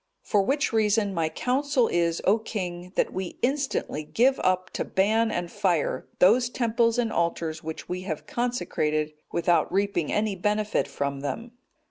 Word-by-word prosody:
For 205 - +2
which 275 +6 0
reason 210 -2 +2
my 165 -3 0
counsel 255 - +1
is, 170 -1 0
O 210 +4 +4
king, 180 -5 -5
that - - +1
we 185 -1 -4
instantly 270 - 0
give 250 - +2
up 185 0 +1
to - - -2
ban 220 +4 +2
and 175 -4 -3
fire 175 -6 0
those 235 +6 +5
temples 230 -1 +1
and 230 -2 0
altars 165 -2 -1
which 160 0 -6
we 180 0 -3
have 165 -5 -5
consecrated 155 -11 -1 0.2
without 170 0 +2
reaping 195 -4 0
any 210 -1 0
benefit 210 +3 0
from 140 -1 -3
them." 185 - -4
195 Hz, 155 wpm, -26 LUFS, 170-230 Hz, 0.2 s, those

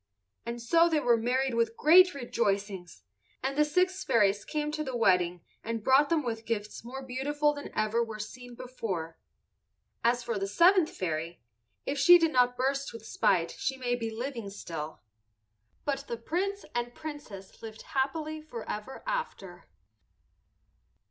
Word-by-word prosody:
And 235 0 -4
so 330 +9 +4
they 315 -2 +2
were 240 -4 +4
married 250 +3 0
with 230 -1 0
great 360 +3 +7
rejoicings, 200 -7 -2 0.4
and 270 +1 -1
the 300 - +4
six 365 +5 +1
fairies 205 -2 +3
came 300 -1 -2
to 305 0 -2
the 260 -4 -3
wedding 180 -5 +2 0.2
and 230 -1 -3
brought 270 +4 +5 0.2
with 230 -2 -1
them 225 - -22
gifts 215 -2 -3
more 265 +3 -7
beautiful 290 +4 0
than 285 -1 -7
ever 215 +2 +1
were 225 -2 -6
seen 245 +3 -8
before. 190 -11 -5 0.8
As 240 +1 +2
for 230 -4 -2
the 195 - -2
seventh 345 - +5
fairy, 165 -2 -4 0.4
if 280 0 -2
she 350 +5 +9
did 330 -2 +2
not 245 -2 +3
burst 275 +2 -1
with 230 -1 -10
spite 170 -6 +1
she 265 0 -3
may 245 -2 -1
be 230 -2 -2
living 230 -1 -5
still. 160 - -7 0.8
But 280 -1 -2
the 235 - -3
Prince 385 - -2
and 240 0 -3
Princess 290 -11 -9
lived 220 -1 -9
happily 310 +3 -2
forever 240 -4 -7
after. 475 - -4
245 Hz, 155 wpm, -29 LUFS, 215-290 Hz, 0.8 s, she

